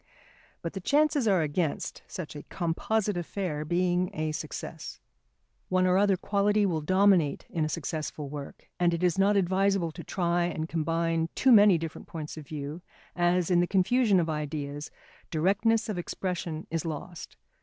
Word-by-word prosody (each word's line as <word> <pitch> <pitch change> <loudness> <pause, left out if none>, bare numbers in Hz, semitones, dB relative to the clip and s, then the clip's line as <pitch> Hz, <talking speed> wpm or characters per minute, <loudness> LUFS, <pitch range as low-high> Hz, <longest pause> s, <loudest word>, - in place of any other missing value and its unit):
But 170 - -4
the 195 - -4
chances 290 +1 +2
are 190 -5 +3
against 155 +1 -2
such 165 -5 -7
a 145 - -6
composite 195 +4 -1
affair 175 -3 -3
being 180 +2 +1
a 155 0 -1
success. 155 - -6 0.7
One 185 0 +3
or 180 0 +3
other 200 -2 +3
quality 205 +2 +2
will 165 -5 0
dominate 185 -2 +3
in 165 - 0
a - - -2
successful 155 -2 -4
work; 140 0 -8
and 175 -1 +3
it 170 - -4
is 180 +1 +2
not 200 +1 +4
advisable 190 -2 +2
to 170 +2 -9
try 175 0 0
and 160 -2 -3
combine 165 0 0
too 265 - +4
many 205 -5 +7
different 160 -1 -6
points 160 -5 -6
of 155 -3 -10
view 150 +2 -6 0.3
as, 175 0 +2
in 175 - +5
the 175 - +2
confusion 200 +2 +3
of 165 - 0
ideas, 150 -1 -4 0.4
directness 200 +7 +2
of 205 -5 -3
expression 175 -3 -4
is 165 -1 -1
lost. 165 +2 -7
175 Hz, 165 wpm, -28 LUFS, 155-195 Hz, 0.7 s, many